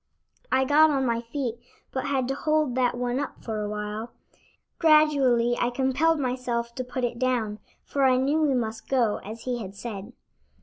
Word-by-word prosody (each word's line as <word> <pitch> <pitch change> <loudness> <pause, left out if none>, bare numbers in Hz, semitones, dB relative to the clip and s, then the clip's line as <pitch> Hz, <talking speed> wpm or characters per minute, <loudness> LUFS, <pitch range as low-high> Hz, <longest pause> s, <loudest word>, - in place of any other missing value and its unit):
I 265 0 +3
got 305 +3 +6
on 275 -3 +1
my 235 -1 0
feet, 240 -1 -4 0.3
but 260 - -3
had 265 -3 0
to - - +1
hold 305 -1 +1
that 245 -1 +1
one 245 +1 -1
up 285 - -5
for 220 -2 -3
awhile. 210 +2 -4 0.7
Gradually 280 -7 +4
I 240 - +2
compelled 270 +6 +1
myself 245 -3 -2
to 255 - -4
put 250 0 -5
it 235 -1 -2
down, 235 -5 0 0.2
for 280 - -3
I 255 -1 +5
knew 280 +5 +1
we 290 -4 +2
must 225 -2 -3
go, 240 -6 +2
as 220 +3 -9
he 250 -1 -2
had 195 -1 -8
said. 210 +1 -7
250 Hz, 180 wpm, -26 LUFS, 235-270 Hz, 0.7 s, got